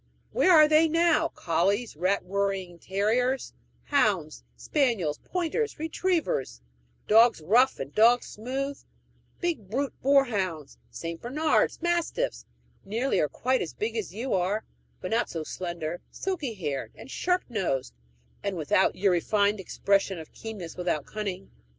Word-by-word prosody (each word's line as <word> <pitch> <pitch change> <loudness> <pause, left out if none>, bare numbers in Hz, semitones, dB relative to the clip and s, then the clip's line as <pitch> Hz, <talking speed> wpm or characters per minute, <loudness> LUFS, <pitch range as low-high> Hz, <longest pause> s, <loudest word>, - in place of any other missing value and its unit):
Where 370 - +4
are 310 -3 +8
they 310 +1 +5
now 335 +1 +3
collies, 200 - 0
rat 185 +5 0
worrying 195 -2 -2
terriers, 230 +8 0 0.3
hounds, 200 - +1
spaniels, 230 - 0
pointers, 370 +6 -2
retrievers 320 - -1 0.5
dogs 225 0 +6
rough 235 +12 +3
and 135 +1 -6
dogs 235 +3 +5
smooth; 270 +5 -4 0.6
big 320 - -2
brute 270 +5 -1
boarhounds, 205 - +1
St. 165 0 -6
Bernard's, 300 +9 +1
mastiffs, 345 +8 -1 0.4
nearly 230 +7 0
or 150 - +1
quite 255 +1 0
as 165 - -5
big 220 +2 -2
as 215 -7 -3
you 230 +7 -3
are, 195 +4 0 0.4
but 185 - -5
not 230 +2 +1
so 165 -2 -4
slender, 170 0 -5
silky 320 - -3
haired, 145 -8 -4
and 265 - -11
sharp 360 0 0
nosed, 175 - -2 0.5
and 195 -2 -3
without 165 +4 +2
your 195 0 +2
refined 205 +4 +2
expression 195 +1 0
of 160 -1 -10
keenness 205 -7 -7
without 175 -5 -1
cunning. 195 -3 -5
215 Hz, 135 wpm, -27 LUFS, 180-270 Hz, 0.6 s, are